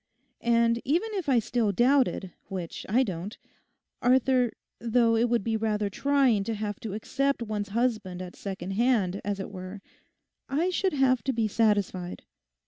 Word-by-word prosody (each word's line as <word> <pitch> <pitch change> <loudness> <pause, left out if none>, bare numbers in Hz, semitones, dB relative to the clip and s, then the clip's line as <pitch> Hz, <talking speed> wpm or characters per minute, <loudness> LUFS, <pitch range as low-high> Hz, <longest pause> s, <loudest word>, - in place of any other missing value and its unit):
And 235 0 +3
even 350 - 0
if 370 -7 -2
I 260 - +4
still 230 -1 +1
doubted, 245 -4 +2 0.2
which 180 -3 -6
I 245 +6 +4
don't, 190 -1 -5 0.6
Arthur, 255 -1 +3 0.3
though 230 0 +3
it 235 +2 +2
would 235 -4 +1
be 225 +1 0
rather 210 -2 -1
trying 270 -4 +2
to 225 - -2
have 205 -1 -4
to 210 -3 -5
accept 275 +4 -1
one's 210 -2 -3
husband 215 -5 -1
at 180 -1 -7
second 190 -2 -5
hand, 205 -4 +1
as 200 0 -2
it 195 - -5
were, 185 +1 -7 0.7
I 325 +7 +1
should 375 0 0
have 265 -3 +2
to 265 - +1
be 225 -2 +1
satisfied. 205 -5 0
225 Hz, 160 wpm, -27 LUFS, 200-255 Hz, 0.7 s, I